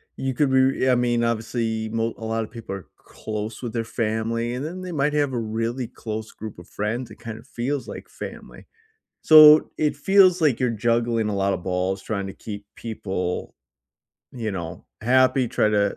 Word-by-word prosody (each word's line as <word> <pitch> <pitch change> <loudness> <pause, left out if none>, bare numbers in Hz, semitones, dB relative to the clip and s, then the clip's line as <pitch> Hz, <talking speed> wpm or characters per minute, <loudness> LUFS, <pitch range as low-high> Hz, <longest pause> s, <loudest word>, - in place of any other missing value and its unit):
you 130 -1 -3
could 140 0 +2
be 130 0 +3
I - - +5
mean, 120 -1 +1
obviously, 115 -1 -1
mo 115 +1 -1
a 110 - -6
lot 115 0 -1
of - - -9
people 115 -4 -6
are 95 - -9
close 110 +2 -6
with 115 - -4
their 115 - -1
family, 115 +1 -2
and 125 +3 -4
then 175 +4 -5
they 185 -1 -6
might 150 -2 0
have 145 -3 +1
a 120 - 0
really 115 +3 -2
close 110 -2 -6
group 110 -4 -9
of 85 - -13
friends. 115 +4 -3
It 105 - -11
kind 110 0 -7
of 125 - -17
feels 135 +3 -3
like - - -8
family. - - -9 0.5
So, 155 -1 +8
it 150 -2 +1
feels 185 +3 +5
like 145 -7 +3
you're 125 - +2
juggling 115 0 +1
a 105 - -2
lot 100 0 +1
of - - -4
balls 95 +1 -1
trying 100 -2 -3
to 95 - -7
keep 100 -2 -8
people, 95 -5 -4 0.8
you 110 -4 -4
know, 85 0 -6 0.2
happy. 130 +1 +3
Try 105 - +2
to 100 -1 +1
115 Hz, 195 wpm, -24 LUFS, 110-130 Hz, 0.8 s, So